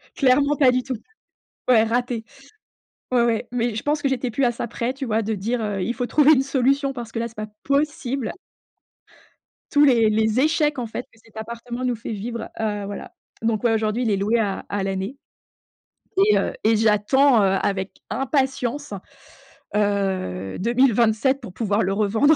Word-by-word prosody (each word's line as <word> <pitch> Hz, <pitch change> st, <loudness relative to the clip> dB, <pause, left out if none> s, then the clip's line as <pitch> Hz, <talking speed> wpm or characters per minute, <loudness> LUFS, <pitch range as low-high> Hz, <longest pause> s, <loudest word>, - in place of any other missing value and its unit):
Clairement 280 Hz, +2 st, +3 dB
pas 265 Hz, -4 st, +5 dB
du 250 Hz, 0 st, 0 dB
tout. 260 Hz, -2 st, -3 dB, 0.7 s
Ouais, 225 Hz, -3 st, +6 dB
raté. 235 Hz, 0 st, -1 dB, 0.9 s
Ouais, 240 Hz, -1 st, +4 dB
ouais 235 Hz, 0 st, 0 dB
mais 235 Hz, -2 st, -1 dB
je 220 Hz, -, -4 dB
pense 295 Hz, 0 st, 0 dB
que 275 Hz, -, +1 dB
j'étais 255 Hz, -2 st, -1 dB
plus 270 Hz, +5 st, -1 dB
à 240 Hz, -, +3 dB
ça 235 Hz, -, -4 dB
près 240 Hz, +3 st, -3 dB
tu 270 Hz, 0 st, -5 dB
vois 225 Hz, -1 st, +1 dB
de 220 Hz, +1 st, -2 dB
dire, 225 Hz, +5 st, -2 dB
heu: 205 Hz, -3 st, -2 dB
«Il 235 Hz, -, -1 dB
faut 245 Hz, -1 st, -2 dB
trouver 300 Hz, 0 st, +5 dB
une 265 Hz, -, +3 dB
solution 275 Hz, +1 st, +1 dB
parce 235 Hz, -3 st, -7 dB
que 230 Hz, -, -3 dB
là 235 Hz, -, -1 dB
c'est 225 Hz, -, -17 dB
pas 215 Hz, 0 st, -4 dB, 0.2 s
possible». 280 Hz, -4 st, -1 dB, 1.4 s
Tous 290 Hz, 0 st, +5 dB
les 230 Hz, -5 st, +5 dB
les 220 Hz, +3 st, +2 dB
échecs 300 Hz, -2 st, +2 dB
en 240 Hz, -, -2 dB
fait 235 Hz, +3 st, -6 dB
que 225 Hz, -, -23 dB
cet 220 Hz, 0 st, -23 dB
appartement 235 Hz, +3 st, -6 dB
nous 245 Hz, -2 st, 0 dB
fait 225 Hz, 0 st, -6 dB
vivre, 230 Hz, +3 st, -5 dB
heu, 205 Hz, -2 st, -1 dB
voilà. 200 Hz, 0 st, -7 dB, 0.3 s
Donc, 225 Hz, 0 st, 0 dB
ouais, 230 Hz, -, +4 dB
aujourd'hui 220 Hz, +3 st, 0 dB
il 220 Hz, -, +1 dB
est 200 Hz, -, +2 dB
loué 215 Hz, +4 st, +1 dB
à 200 Hz, -3 st, -1 dB
à 200 Hz, -1 st, -2 dB
l'année 195 Hz, +6 st, -3 dB, 1.1 s
et -, -, +5 dB
heu -, -, -1 dB
et 220 Hz, +1 st, +4 dB
j'attends, 225 Hz, +4 st, +4 dB
heu, 195 Hz, 0 st, +3 dB
avec 195 Hz, -1 st, -3 dB
impatience, 270 Hz, -2 st, -1 dB, 0.8 s
heu, 190 Hz, -, -1 dB
2027 240 Hz, +2 st, +2 dB
pour 225 Hz, -7 st, -9 dB
pouvoir 210 Hz, -1 st, 0 dB
le 195 Hz, +1 st, 0 dB
revendre. 220 Hz, +9 st, +3 dB
235 Hz, 185 wpm, -23 LUFS, 215-265 Hz, 1.4 s, Ouais